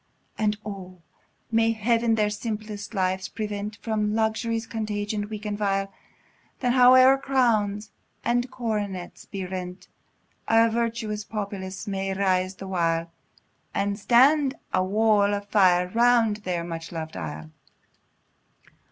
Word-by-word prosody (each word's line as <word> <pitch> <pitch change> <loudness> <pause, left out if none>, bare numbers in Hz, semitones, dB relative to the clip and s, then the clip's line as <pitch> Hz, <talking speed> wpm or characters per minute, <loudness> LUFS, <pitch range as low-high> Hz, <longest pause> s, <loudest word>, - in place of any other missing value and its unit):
And 210 -1 0
O! 190 -3 -7 0.5
may 225 0 +3
Heaven 230 +1 +2
their 210 -1 +1
simple 215 0 -4 0.2
lives 190 -2 -1
prevent 210 -1 -4
From 215 -2 0
luxury's 225 +1 0
contagion, 210 -2 -3
weak 215 -1 -7
and 210 -1 -2
vile! 195 -1 -1 0.7
Then 250 -2 +1
howe'er 255 +1 +7
crowns 220 -6 +1 0.3
and 245 +1 +1
coronets 210 -7 -4
be 195 -2 -5
rent, 180 0 -7 0.6
A 225 0 +4
virtuous 225 -2 -2
populace 200 -2 -5
may 195 -1 -2
rise 185 -1 +1
the 195 - -8
while, 165 -2 0 0.6
And 200 0 -1
stand 270 +5 +4 0.2
a 185 - +3
wall 205 +1 +3
of 200 0 -6
fire 180 -3 +4
around 235 -2 +4
their 180 -5 -3
much 165 -1 -6
lov'd 160 -2 -6
isle. 80 0 -6
210 Hz, 125 wpm, -25 LUFS, 190-225 Hz, 0.7 s, howe'er